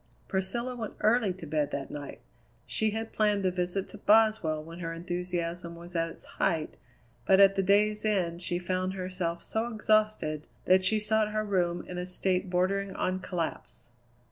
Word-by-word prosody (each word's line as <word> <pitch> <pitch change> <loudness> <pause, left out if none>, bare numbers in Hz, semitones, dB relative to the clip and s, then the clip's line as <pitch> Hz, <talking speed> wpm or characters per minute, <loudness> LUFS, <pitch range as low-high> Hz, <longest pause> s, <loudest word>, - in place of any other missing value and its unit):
Priscilla 230 +6 -2
went 225 -3 -5
early 220 -1 +3
to 180 -2 -8
bed 150 -1 0
that 140 -2 -4
night. 145 -1 -7 0.4
She 220 - 0
had 220 +1 -4
planned 210 -2 +2
a 185 - +3
visit 180 +2 -2
to 210 - -11
Boswell 210 -8 +3
when 165 +2 -10
her 165 -2 -3
enthusiasm 175 0 -3
was 175 +1 -11
at 165 0 +1
its - - -8
height, 160 -2 -1 0.5
but 190 - +6
at 195 0 +8
the 195 - +1
day's 210 +2 +3
end 180 -5 0
she 175 0 -1
found 185 +1 -1
herself 180 -2 -3
so 220 +2 -2
exhausted 215 -8 +1 0.2
that 185 +1 +5
she 215 +4 +3
sought 215 0 +1
her 215 0 0
room 175 -4 0
in 180 0 -5
a 180 - -4
state 185 0 0
bordering 190 +2 0
on 185 0 -1
collapse. 165 -9 -5
185 Hz, 175 wpm, -29 LUFS, 170-210 Hz, 0.5 s, at